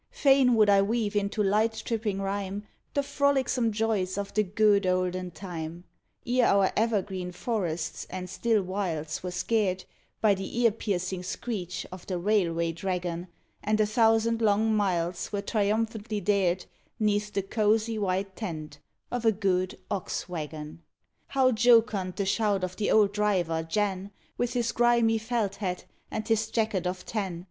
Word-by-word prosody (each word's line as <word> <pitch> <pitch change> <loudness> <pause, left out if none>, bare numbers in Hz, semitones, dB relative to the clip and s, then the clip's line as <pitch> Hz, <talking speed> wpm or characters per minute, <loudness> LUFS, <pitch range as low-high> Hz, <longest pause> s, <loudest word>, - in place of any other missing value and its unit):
Fain 270 - +4
would 215 -2 +5
I 200 -1 +6
weave 215 0 0
into 205 +1 0
light 215 +3 +1
tripping 215 -4 -1
rhyme 200 +1 -3 0.3
The 285 - +2
frolicsome 275 -4 +1
joys 210 -4 0
of 200 -1 -4
the 215 - +3
good 205 0 +3
olden 185 0 0
time, 170 -1 -7 0.4
Ere 245 0 +3
our 195 -1 +4
evergreen 195 -5 0
forests 175 -5 -3
and 185 -1 -5
still 220 0 +1
wilds 175 -5 -3
were 180 - -4
scared 185 0 0 0.3
By 215 -2 +4
the 195 +4 -4
ear 230 -2 +5
piercing 185 -4 -2
screech 180 -1 -4
of 185 -1 -10
the 185 - -2
Railway 170 -4 +1
Dragon 175 0 -3 0.4
And 215 +1 +1
a 215 - +4
thousand 225 +1 +3
long 220 +1 +3
miles 180 -4 0
were 200 -1 -2
triumphantly 215 +1 -1
dared 190 -3 +1 0.3
'Neath 210 -1 +1
the 200 - -1
cosy 215 +2 +1
white 190 0 -1
tent 155 -8 -6 0.3
of 245 -1 -2
a 225 - +5
good 185 -3 0
Ox 195 -3 -3
wagon 155 -2 -6 0.5
How 260 -2 +3
jocund 220 -5 +3
the 200 - -1
shout 200 -1 +1
of 185 0 -3
the 210 - -1
old 205 -2 +4
driver, 185 -6 +1
Jan, 190 +3 -1 0.3
With 245 0 -1
his 235 -2 0
grimy 235 -1 +3
felt 220 -3 -1
hat, 180 -3 -3 0.2
and 215 0 -4
his 220 -1 +1
jacket 215 -6 0
of 180 0 -4
tan. 195 -6 -3
205 Hz, 155 wpm, -28 LUFS, 185-220 Hz, 0.5 s, I